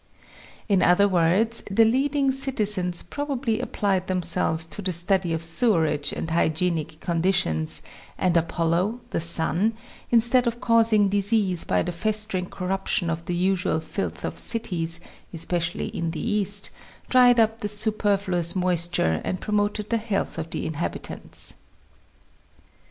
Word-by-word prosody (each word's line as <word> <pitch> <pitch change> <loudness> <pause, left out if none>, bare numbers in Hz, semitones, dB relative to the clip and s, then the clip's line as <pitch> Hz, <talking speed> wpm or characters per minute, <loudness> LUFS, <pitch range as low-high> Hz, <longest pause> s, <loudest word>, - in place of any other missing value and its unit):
In 195 -3 +3
other 190 +3 +5
words, 190 +6 +2
the 225 +3 +4
leading 275 +4 +1
citizens 210 -10 0
probably 270 -6 -2
applied 200 -7 -1
themselves 170 -3 0
to 165 +5 -6
the 185 -2 -2
study 180 +1 +1
of 165 0 -2
sewerage 165 -5 +1
and 160 - -5
hygienic 160 -1 0
condi 170 +1 +1
tions, 80 - 0 0.3
and 180 -2 +1
Apollo 170 +6 0
(the - - -1
Sun) 170 +6 +1 0.3
instead' 240 +2 +3
of 235 0 -2
causing 225 -3 +3
disease 200 -2 +1
by - - +1
the 180 - -3
festering 210 0 -1
corruption 185 -2 -2
of 165 0 -4
the 175 - -2
usual 185 -2 +1
filth 90 - -5
of - - -4
cities, 170 -7 -1 0.3
especi 170 +1 -1
ally - - -3
in 165 -1 -2
the 160 - -5
East, 205 -3 -1 0.4
dried 245 -2 +6
up 225 0 +2
the 210 - -2
superfluous 205 -4 0
moisture, 175 - +1
and 185 - -3
promoted 210 +1 -1
the 230 - +3
health 210 -6 -3
of 160 0 -5
the - - -4
inhabitants. 160 +1 -1
185 Hz, 140 wpm, -24 LUFS, 170-215 Hz, 0.4 s, dried